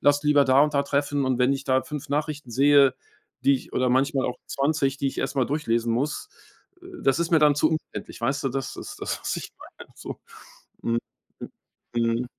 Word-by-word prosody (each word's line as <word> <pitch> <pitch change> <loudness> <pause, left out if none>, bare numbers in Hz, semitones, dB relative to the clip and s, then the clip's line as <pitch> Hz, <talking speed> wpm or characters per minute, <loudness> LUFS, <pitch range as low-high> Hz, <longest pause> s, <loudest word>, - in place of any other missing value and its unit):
lass 145 +1 +3
lieber 145 -1 +5
da 130 +1 +5
und 150 -1 +1
da 140 - +3
treffen“ 140 0 0
und 130 -1 0
wenn 125 +2 +3
ich 135 0 -3
da 130 -1 +2
5 150 -2 -7
Nachrichten 150 -2 -2
sehe, 140 +2 +5 0.5
die 140 - +5
ich 130 - -6
oder 125 0 +1
manchmal 135 +1 +2
auch 125 - -4
20, 140 -1 0
die 140 - -2
ich 135 - -3
erst 140 - -2
mal 130 -3 +2
durchlesen 120 -6 0
muss, 140 +6 -2 0.5
äh, - - -12 0.2
das 135 +3 +3
ist 170 - -1
mir 165 - +5
dann 150 -1 +5
zu 155 - +3
umständlich, 135 -9 -5
weißt 135 +4 -1
du? 135 - +2
Das 135 +1 -4
ist - - -8
das, - - -3
was - - -2
ich - - -7 0.3
meine - - -12
so. - - -8 0.7
Mhm, 115 0 +1 0.4
mhm. - - -6 0.7
Mhm. 125 - -2
140 Hz, 215 wpm, -25 LUFS, 130-145 Hz, 0.7 s, lieber